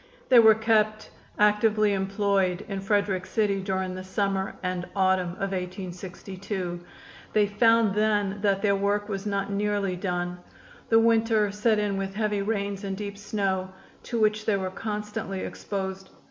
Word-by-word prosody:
They 250 -2 +8
were 220 -1 +8
kept 215 -1 +1 0.3
actively 210 0 +3
employed 195 -1 0
in 195 -2 -4
Frederick 200 -2 0
City 205 -3 +1
during 190 -1 -2
the 185 0 -6
summer 195 0 -1
and 180 -1 -2
autumn 185 -2 +2
of 195 +1 -3
1862. 185 0 -5 0.5
They 210 -1 +4
found 225 +1 +3
then 205 -1 +1
that 200 -1 +1
their 200 -1 +3
work 205 +1 0
was 195 0 -3
not 200 0 -1
nearly 200 -2 0
done. 180 -1 -3 0.5
The 225 - +5
winter 225 -2 +3
set 210 +2 +2
in 205 -2 0
with 195 0 -4
heavy 210 -2 0
rains 200 -1 -2
and 195 -1 -3
deep 200 -1 -5
snow, 200 -2 -2 0.3
to 235 - -3
which 215 0 +1
they 210 -2 +3
were 190 -1 -3
constantly 210 -1 -4
exposed. 190 -1 -5
200 Hz, 150 wpm, -26 LUFS, 190-210 Hz, 0.5 s, They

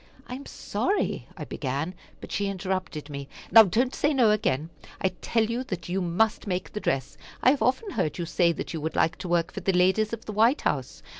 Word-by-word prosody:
"I - - -8
am 270 +2 -7
sorry," 410 - -1
I - - -5
began, 140 +6 -3 0.3
but - - -9
she 205 - 0
interrupted 185 -5 -3
me. 140 -2 -7 0.2
"Now 225 - +11
don't 235 +6 +2
say 295 0 +1
no 235 -5 +5
again. 160 -7 0 0.3
I 190 - +2
tell 225 -2 +2
you 230 +3 -2
that 185 -6 -5
you 190 +2 0
must 195 +6 +1
make 180 -1 -3
the 210 - -3
dress. 140 -4 -2 0.2
I 255 - +7
have 280 - -1
often 260 - +1
heard 180 - -1
you 175 - -2
say 170 +1 +3
that 170 - -5
you 160 - -4
would 160 +1 -3
like 160 - +2
to - - -6
work 170 -1 +1
for - - -4
the 195 +1 0
ladies 190 +4 +3
of 230 -1 -6
the 215 - -5
White 230 +7 +4
House. - - -2
190 Hz, 225 wpm, -27 LUFS, 170-225 Hz, 0.3 s, Now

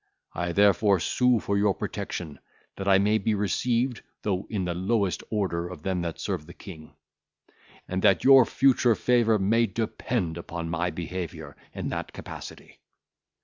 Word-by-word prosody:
I 85 0 -2
therefore 100 +1 +4
sue 125 +7 +2
for 100 0 -1
your 100 -1 +2
protection, 80 -5 -5 0.4
that 95 - -5
I 95 -1 +6
may 105 +2 +2
be 110 +2 0
received, 115 +5 0 0.2
though 95 -2 -2
in 100 -4 -2
the 90 - -2
lowest 95 -1 0
order 90 -5 -1
of 85 -4 -10
them 95 -2 -1
that 85 -2 -4
serve 90 -6 -3
the 85 - -12
King; 80 -5 -12 0.9
and 95 +1 -2
that 95 - +4
your 135 -1 +8
future 125 -2 +3
favour 120 -2 +3
may 115 +4 +2
depend 105 -4 -2
upon 85 -1 -5
my 85 +2 0
behaviour 80 -3 -6 0.2
in - - -3
that - - -5
capacity. - - -10
95 Hz, 155 wpm, -26 LUFS, 85-110 Hz, 0.9 s, your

